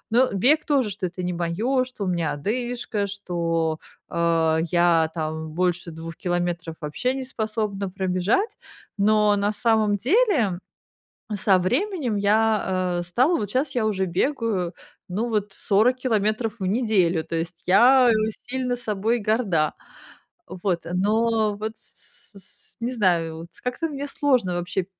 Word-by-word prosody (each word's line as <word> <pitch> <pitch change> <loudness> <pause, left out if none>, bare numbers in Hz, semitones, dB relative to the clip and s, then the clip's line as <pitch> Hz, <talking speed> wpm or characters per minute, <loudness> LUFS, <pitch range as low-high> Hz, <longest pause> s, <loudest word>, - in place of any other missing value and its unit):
ну, 250 +3 +4
бег 270 +11 +3
тоже, 275 -6 +2
что 200 -1 -5
это 180 +1 -6
не 180 0 -2
моё, 215 +11 0
что 250 -5 -6
у - - -3
меня 170 -4 0
одышка, 235 - -2
что, 170 -5 -2 0.3
э, 165 -1 +2
я 170 -2 +3
там 160 0 -4
больше 175 +1 -1
2 165 0 -8
километров 175 -2 -2
вообще 155 +12 -1
неспособна 215 -6 -3
пробежать. 190 - 0 0.4
Но 210 0 +3
на 205 +1 +1
самом 215 -1 +2
деле 270 - +2 0.8
со 195 -1 +3
временем 260 - 0
я, 200 -4 +1
э, - - -3
стала 255 - +2
вот 205 -8 -3
щас 265 +5 0
я 235 -3 +1
уже 190 -3 0
бегаю, 190 - -1 0.3
ну 215 +7 -2
вот 210 -3 -1
40 220 +8 +2
километров 220 -2 -1
в 190 - -1
неделю, 190 -6 +2
то - - -7
есть 165 +1 -4
я 245 +6 +6 0.4
сильно 250 -1 -1
собой 225 0 -1
горда. 205 -8 +1 0.7
Вот, 180 -2 -3
но 215 +2 +2
вот, 220 +1 -4
с 200 - -15
с 195 - -14 0.3
с - - -34
не 240 +2 -2
знаю, 170 -7 +1
вот 165 - -8 0.2
как-то 250 +6 -2
мне 285 -1 -5
сложно 255 -10 +1
вообще 175 +1 -2
205 Hz, 145 wpm, -24 LUFS, 175-240 Hz, 0.8 s, я